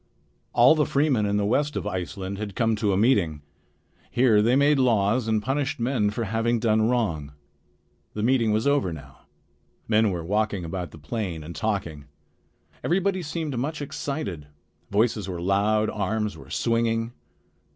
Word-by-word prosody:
All 120 +4 +7
the 155 -2 +1
freemen 140 -7 +2
in 100 0 +1
the 105 - +1
west 145 +7 +1
of - - -3
Iceland 95 +2 -4
had 105 -3 -5
come 115 -1 +2
to 105 -1 +1
a 95 - +1
meeting. 95 - +2 0.7
Here 120 -4 +4
they 120 +4 +3
made 140 +1 +4
laws 115 -1 +2
and 110 -1 +1
punished 135 +1 -1
men 115 -3 +1
for 110 +3 -3
having 115 +3 0
done 110 -1 +2
wrong. 85 -13 -1 0.8
The 105 - -2
meeting 120 -2 +3
was 110 +1 +1
over 140 -10 +2
now. 70 -2 -12 0.6
Men 110 0 +3
were 85 -3 -4
walking 105 -1 0
about 90 +1 -4
the - - -13
plain 85 +1 -4
and 85 +2 -8
talking. 85 -10 -3 0.8
Everybody 190 +2 +1
seemed 155 -3 -4
much 145 +4 -3
excited. 135 - -4 0.4
Voices 105 -1 +1
were 90 -2 -4
loud, 100 +4 +2
arms 105 +1 -2
were - - -13
swinging. 115 0 0
110 Hz, 160 wpm, -25 LUFS, 100-125 Hz, 0.8 s, All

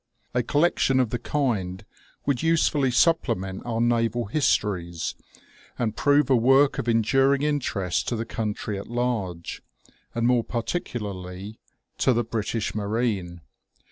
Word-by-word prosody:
A 125 - +2
collection 145 0 +2
of 125 -4 +1
the 120 - -1
kind 110 -9 -1 0.4
would 140 -4 0
usefully 155 -4 +2
supplement 115 - +1
our 115 -1 -1
naval 120 0 +1
histories, 100 - 0 0.6
and 110 -3 -1
prove 145 +1 +3
a - - +7
work 135 +4 +4
of 120 - -1
enduring 135 +5 +3
interest 120 - -1
to 120 - 0
the 115 0 -3
country 105 -3 -3
at 100 - -8
large, 115 -8 -2 0.5
and 115 0 0
more 120 -1 +3
particularly 105 - -4 0.4
to 130 - +4
the 120 0 +1
British 115 -1 -2
marine. 100 -5 -2
115 Hz, 130 wpm, -25 LUFS, 100-130 Hz, 0.6 s, a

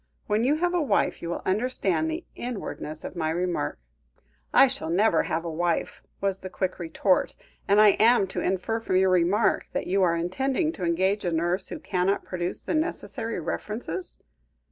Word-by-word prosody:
When 210 +2 +1
you 275 +4 +3
have 350 +3 0
a 355 - +2
wife, 290 - +1
you 170 - -4
will 170 - -4
understand 220 - 0
the 320 +2 -4
inwardness 200 -10 -6
of - - -7
my 160 -2 -1
remark." 175 - -1 0.7
"I - - +7
shall 250 -12 -3
never 180 0 +3
have 165 +2 -2
a 165 - -3
wife," 170 +1 -1 0.2
was 195 -1 0
the 185 - -7
quick 185 0 -3
retort, 180 +3 +1 0.3
"and 200 +1 +5
am 215 +3 +6
I - - +1
to 190 - -4
infer 190 +5 -1
from 225 -4 -2
your 190 0 +4
remark 185 +5 +2
that - - -2
you 195 +2 +1
are 170 -2 +3
intending 265 - 0
to 185 - -8
engage 190 +4 +1
a 175 - 0
nurse 175 +3 0
who - - -6
cannot 185 +1 -1
produce 175 -1 -3
the - - -3
necessary 310 - -2
references?" 185 0 -4
190 Hz, 185 wpm, -26 LUFS, 175-225 Hz, 0.7 s, I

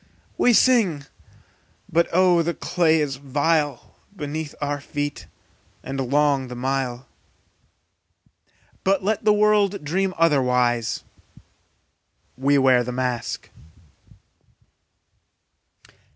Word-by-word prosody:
We 245 - +3
sing, 210 - +3 0.8
but 170 +1 +1
oh 180 -1 +4
the 170 +1 -2
clay 160 -3 +1
is 140 -3 -2
vile 145 0 -1 0.2
Beneath 150 -2 -5
our 145 -1 -3
feet, 145 0 -5 0.6
and 135 -2 -4
long 140 -2 +2
the 125 - -8
mile; 130 0 -3 1.8
But 195 0 +1
let 215 +2 -1
the 210 - +6
world 210 -3 +2
dream 185 +5 -1
otherwise, 125 -7 +1 1.3
We 140 +2 +2
wear 130 -2 +4
the 125 - -5
mask! 125 -1 -3
145 Hz, 95 wpm, -22 LUFS, 130-175 Hz, 1.8 s, the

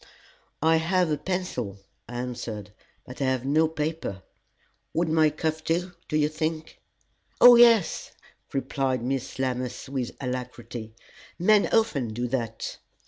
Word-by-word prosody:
"I 160 0 +5
have 175 +1 +1
a 150 - +1
pencil," 150 - -3 0.3
I 120 - -7
answered; 115 -4 -5 0.3
"but 125 +2 -9
I - - +2
have 130 -1 0
no 155 +4 +3
paper. 155 - -4 0.7
Would 170 0 +1
my 155 -1 +4
cuff 155 +1 -2
do, 175 +3 -1 0.2
do 155 - 0
you 150 -1 +3
think?" 155 +1 -4 0.6
"Oh, 245 0 +10
yes!" 230 -5 +5 0.4
replied 135 -2 -1
Miss 130 +1 -3
Lammas, 130 -1 -2
with 130 -3 -3
alacrity; 125 -3 -6 0.4
"men 205 +3 +4
often 140 - +1
do 120 +1 -1
that." 115 -3 -3
145 Hz, 135 wpm, -26 LUFS, 125-160 Hz, 0.7 s, Oh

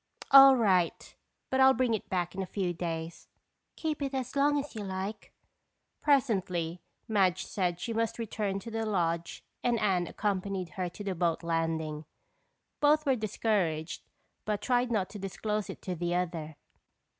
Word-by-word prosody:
"All 275 -1 +10
right, 190 -8 +1 0.4
but 265 - +1
I'll 265 0 +7
bring 245 -1 +1
it 220 - -3
back 180 -2 -1
in 195 - -3
a 190 - -4
few 185 -3 -2
days." 165 -1 -5 0.5
"Keep 310 -2 -3
it 275 -1 -2
as 260 0 -3
long 290 +1 +3
as 285 +1 -4
you 215 -3 -5
like." 190 +2 -5 0.7
Presently, 190 - +1 0.3
Madge 190 -4 +2
said 180 -3 -1
that 175 - -17
she 230 - -3
must 225 0 -1
return 210 -3 -2
to 230 - -8
the 225 0 -2
lodge 170 -5 -1 0.2
and 240 -2 +2
Anne 185 -5 +1
accompanied 195 -3 -2
her 180 +3 -3
to 205 - -9
the 195 -2 -2
boat 170 -1 0
landing. 160 -2 -1 0.7
Both 300 +1 +4
were 270 -2 +3
discouraged 195 -7 -1 0.4
but 210 -1 -1
tried 245 +3 +1
not 200 -5 +1
to 210 - -7
disclose 210 +2 -3
it - - -8
to 185 - -3
the 175 0 -1
other. 165 -3 -3
195 Hz, 170 wpm, -30 LUFS, 175-230 Hz, 0.7 s, All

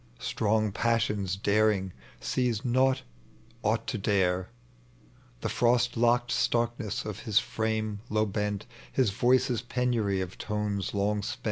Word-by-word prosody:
Strong 110 - 0
passion's 105 -4 0
daring 100 -2 +2 0.3
sees 120 - -1
not 130 +2 +2 0.6
aught - - 0
to - - -3
dare: 95 -2 +1 0.9
The - - -1
frost 120 0 +2
locked 120 +1 +2
starkness 120 -1 0
of 105 -3 -5
his 110 -4 -1
frame 110 -2 0
low 110 0 +1
hent, 105 -1 -1 0.3
His 125 -6 +2
voice's 120 +2 +2
penary 120 -5 0
of 95 -1 -5
tones 105 -2 -2
loi^ 105 0 0
spent 120 +4 -4
110 Hz, 125 wpm, -29 LUFS, 100-120 Hz, 0.9 s, daring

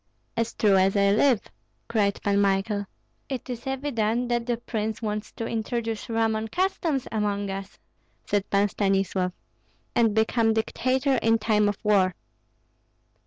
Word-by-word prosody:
"As 230 0 -1
true 200 -3 +4
as 190 +1 +3
I 200 0 +4
live," 230 +2 +4 0.5
cried 205 -3 +1
Pan 200 0 +2
Michael. 200 +1 +1 0.4
"It 265 -2 -4
is 240 +1 -6
evident 245 -3 -1
that 240 0 0
the 240 -1 0
prince 220 -2 -3
wants 210 -1 -3
to 230 - -4
introduce 225 0 -3
Roman 225 -1 0
customs 330 - -1
among 205 -2 -1
us," 195 +1 -7 0.5
said 205 -1 -1
Pan 200 +1 +3
Stanislav, 195 -2 0 0.6
"and 225 -3 +3
become 225 0 +3
dictator 260 +4 +1
in 225 -1 +3
time 210 -1 +2
of 205 - -3
war." 195 -4 +3
220 Hz, 140 wpm, -26 LUFS, 200-235 Hz, 0.6 s, true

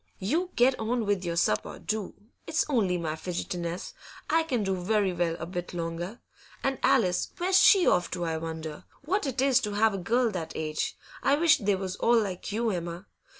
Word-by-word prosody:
'You 320 - -1
get 255 +2 +4
on 225 +1 -1
with 200 -2 0
your 170 -1 -2
supper, 105 -10 0
do. 215 -3 -3 0.3
It's 320 0 +1
only 205 -10 +1
my 160 -3 -2
fidgetiness; 175 - -4 0.4
I 325 - +4
can 255 -9 -1
do 195 -1 0
very 195 +1 +1
well 170 -1 0
a 165 - -4
bit 175 0 -5
longer. 170 +5 -4 0.4
And 270 -2 0
Alice, 180 -1 +2
where's 370 +2 +3
she 385 -2 +6
off 175 0 +3
to, 175 - -2
I 160 -1 -1
wonder? 160 -1 -6 0.2
What 370 0 0
it 265 0 0
is 270 -2 +5
to 210 -5 -3
have 215 +1 +3
a 195 - -3
girl 235 +6 +1
that 165 -5 -5
age! 155 -1 -2 0.2
I 275 - +3
wish 325 0 +4
they 205 -1 +1
was 190 0 -4
all 235 0 +4
like 195 -2 -3
you, 225 +2 0
Emma. 175 +1 -4
195 Hz, 195 wpm, -28 LUFS, 175-245 Hz, 0.4 s, she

